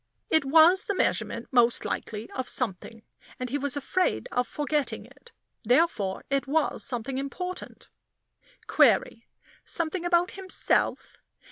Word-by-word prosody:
It 315 -3 +3
was 325 +7 +5
the 405 - -2
measurement - - -1
most 240 -2 +3
likely 215 +1 -4
of 260 - -4
something, 225 -1 -4 0.4
and 250 -1 -4
he 285 - -1
was 285 0 -1
afraid 365 - -1
of 250 - 0
forgetting 295 -1 -2
it; - - -19 0.3
therefore 235 - +1
it 275 0 0
was 305 +2 0
something 255 +1 -2
important. 360 +7 -6 0.8
Query - - +2 0.4
something 335 +1 -2
about 350 0 +2
himself? 380 -1 -1
285 Hz, 125 wpm, -27 LUFS, 250-345 Hz, 0.8 s, was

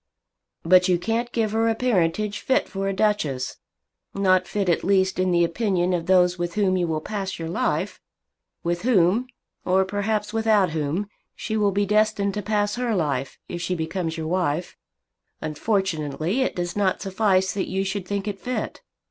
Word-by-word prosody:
"But 180 +2 +5
you 180 -1 +3
can't 230 +6 -2
give 220 -3 0
her 225 +1 +2
a 225 - +1
parentage 210 -3 0
fit 265 - +1
for 195 -1 -3
a - - +1
Duchess; 190 -11 0 0.6
not 185 -2 +3
fit 200 -2 -1
at 170 - +2
least 190 -1 +2
in 185 0 +2
the 175 -1 +3
opinion 180 0 0
of 170 -1 -2
those 180 -1 +4
with 175 0 -3
whom 195 -3 +2
you 180 -2 +1
will 155 -1 -1
pass 195 +1 -4
your 165 -1 -5
life, 175 +3 -1 0.6
with 175 0 -1
whom, 220 0 +3 0.4
or 190 +1 +3
perhaps 210 +2 -2
without 215 -5 +3
whom, 160 +6 -2 0.3
she 220 - -4
will 210 -2 +3
be 200 +1 +1
destined 210 -1 +2
to 210 - -2
pass 205 +1 0
her 245 -3 0
life, 140 -6 -1
if 175 - -5
she 180 +1 -1
becomes 165 0 -3
your 160 -1 -3
wife! 175 -1 -1 0.6
Unfortunately 160 - -1
it 260 - 0
does 175 -1 -3
not 200 -3 +1
suffice 190 -1 +1
that 195 - -2
you 190 +1 0
should 195 -1 -3
think 200 +1 -2
it 200 -2 -3
fit. 255 - -4
190 Hz, 180 wpm, -24 LUFS, 175-210 Hz, 0.6 s, But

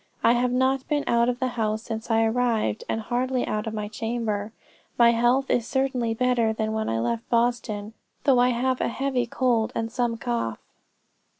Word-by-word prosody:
I 230 - +6
have 245 +1 +1
not 260 +1 +1
been 295 -2 0
out 235 0 +3
of 245 - -1
the 260 - 0
house 220 -2 -2
since 225 0 -6
I 225 0 +3
arrived, 225 - 0
and 225 - -1
hardly 250 +2 -1
out 215 +1 -2
of 220 - -3
my 210 -1 -3
chamber. 220 -1 -3 0.5
My 235 -1 +6
health 240 +3 +2
is 235 -2 +1
certainly 260 -4 0
better 240 -2 +2
than 220 0 -2
when 220 0 -1
I 115 - 0
left 115 0 -2
Boston, 230 -3 0 0.3
though 265 -3 +4
I 250 +1 +4
have 255 +1 0
a - - +1
heavy 255 -1 -1
cold 235 -3 +1
and 225 0 -2
some 240 -1 -1
cough. 115 - -2
235 Hz, 190 wpm, -25 LUFS, 220-250 Hz, 0.5 s, I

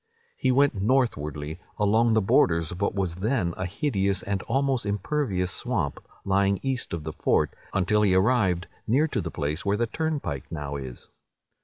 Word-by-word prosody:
He 130 - +1
went 140 +2 +4
northwardly, 80 - 0 0.2
along 110 +3 +3
the 110 - +3
borders 85 -4 +3
of 90 - -7
what 100 - 0
was 90 -4 -1
then 100 -3 0
a 95 - -3
hideous 100 -3 0
and 100 -1 -2
almost 135 0 +1
impervious 100 -2 -1
swamp, 100 - -2 0.3
lying 100 0 +2
east 135 -2 -2
of 85 -2 -4
the 80 0 -5
fort, - - +1 0.2
until 105 +3 +2
he 100 -3 +4
arrived 95 -4 +2 0.2
near 140 +8 +3
to 115 - -1
the - - -4
place 75 -1 -3
where 100 +1 +1
the 120 - +1
turnpike 140 - -3
now 75 -3 -4
is. 65 -3 -7
100 Hz, 170 wpm, -26 LUFS, 85-120 Hz, 0.3 s, went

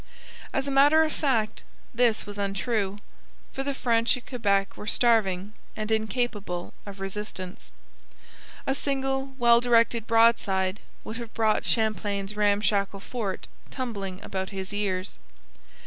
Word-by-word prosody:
As 270 +1 -1
a - - -1
matter 290 +4 +6
of 310 - -1
fact 225 -7 0 0.3
this 235 -2 +2
was 205 0 -7
untrue, 200 0 -1 0.6
for 270 - -3
the 275 0 -2
French 230 -2 +2
at 250 - -12
Quebec 200 -6 0
were 210 - -9
starving 210 -5 +2 0.2
and 215 0 -3
incapable 215 -5 -1
of 200 -1 -8
resistance. 195 -1 -6 1.0
A 270 - +1
single 270 -1 -2
well 235 -2 +5
directed 235 -2 +3
broadside 210 -4 +3 0.2
would 220 - -6
have 235 -2 -8
brought 220 -1 +2
Champlain's 210 -2 0
ramshackle 205 -1 +1
fort 210 -6 -4 0.2
tumbling 200 -8 -4
about 190 -1 -3
his 190 0 -5
ears. 185 - -2
215 Hz, 130 wpm, -27 LUFS, 195-240 Hz, 1.0 s, matter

